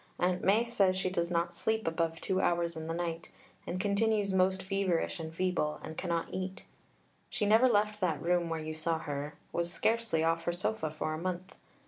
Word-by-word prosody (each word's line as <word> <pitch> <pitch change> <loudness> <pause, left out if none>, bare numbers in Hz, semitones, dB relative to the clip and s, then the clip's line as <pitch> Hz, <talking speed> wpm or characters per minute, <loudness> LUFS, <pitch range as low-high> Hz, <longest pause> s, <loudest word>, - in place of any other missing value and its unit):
Aunt 180 0 +1
Mai 215 +5 +4
says 195 -6 +2
she 185 -1 -1
does 170 -2 0
not 170 0 0
sleep 220 +4 0
above 165 0 0
two 190 -1 0
hours 170 -1 +1
in 160 0 -5
the 165 - -2
night, 170 -1 -3 0.4
and 180 - -2
continues 205 0 +1
most 190 0 +2
feverish 190 -2 0
and 160 -1 -5
feeble, 165 -3 0
and 160 - -6
cannot 170 -2 -1
eat. 185 0 -4 0.6
She - - -1
never 225 +5 +6
left 210 -1 +2
that 165 -6 +1
room 175 +1 +1
where 165 -1 -2
you 155 0 -4
saw 160 +1 0
her, 145 -1 -4 0.2
was 170 0 -1
scarcely 225 -7 +1
off 165 0 +1
her 175 - +1
sofa 175 -1 -1
for 155 0 -3
a 155 - -4
month. 185 +1 -4
175 Hz, 195 wpm, -32 LUFS, 165-195 Hz, 0.6 s, never